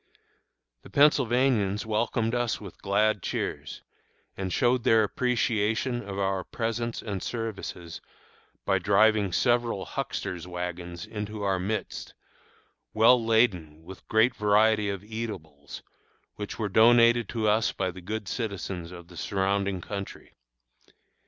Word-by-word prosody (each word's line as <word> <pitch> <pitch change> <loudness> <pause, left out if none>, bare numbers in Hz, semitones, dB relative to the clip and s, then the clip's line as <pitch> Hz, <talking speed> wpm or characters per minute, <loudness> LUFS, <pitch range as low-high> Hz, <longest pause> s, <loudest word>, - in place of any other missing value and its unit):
The - - -14
Pennsylvanians 125 -7 +3
welcomed 110 +1 0
us 120 -2 0
with 100 -4 -11
glad 105 +1 +1
cheers, - - -4 0.5
and 95 -1 -4
showed 125 +1 +2
their 115 -3 +5
appreciation 120 +1 0
of 100 -2 -7
our 95 -1 0
presence 115 +2 -3
and 100 -4 -4
services 100 -7 -5 0.6
by 95 - +2
driving 105 +1 +3
several 115 0 +1
"huckster's 90 -1 -4
wagons" 90 -1 -5
into 105 0 -6
our 95 -2 +1
midst, 105 +4 -4 0.8
well 115 +2 +5
laden 95 -10 +1
with 90 +1 -10
a - - -32
great 110 +3 +4
variety 105 0 +3
of 100 -1 -4
eatables, 100 -10 -7 0.5
which 105 -1 -6
were 110 - -1
donated 115 +3 +5
to 110 -2 -1
us 110 +1 +2
by 95 -1 -2
the 90 +1 -11
good 105 +2 -5
citizens 95 -6 -4
of 85 -1 -11
the 90 - -14
surrounding 100 +1 -1
country. 100 +2 -7
105 Hz, 125 wpm, -27 LUFS, 95-115 Hz, 0.8 s, their